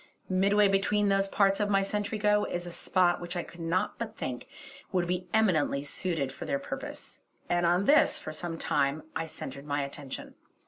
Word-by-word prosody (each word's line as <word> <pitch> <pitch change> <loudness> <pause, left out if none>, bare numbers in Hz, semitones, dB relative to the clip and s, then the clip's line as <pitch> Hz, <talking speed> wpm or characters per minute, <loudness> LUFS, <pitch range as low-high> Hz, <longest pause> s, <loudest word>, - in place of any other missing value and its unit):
Midway 200 +2 +4
between 200 +1 +2
those 195 0 +2
parts 195 0 +3
of 205 -1 +1
my 195 -1 +3
sentry 205 +2 -2
go 210 0 +3
is 175 0 -3
a 175 - -6
spot 175 0 +2
which 175 +1 -5
I 175 - -1
could 170 - -14
not 165 +2 -1
but 220 -2 -5
think 125 -1 -4 0.4
would 180 -2 +1
be 180 +1 -2
eminently 170 -10 +2
suited 145 -2 -2
for - - -8
their 280 - 0
purpose, 280 - -7 0.3
and 175 0 +2
on 175 +3 +3
this 290 +4 +5
for 155 - -7
some 165 +1 -5
time 140 0 0
I 165 - -2
centred 140 -2 -7
my 145 0 0
attention. 140 -1 -7
180 Hz, 190 wpm, -29 LUFS, 160-205 Hz, 0.4 s, this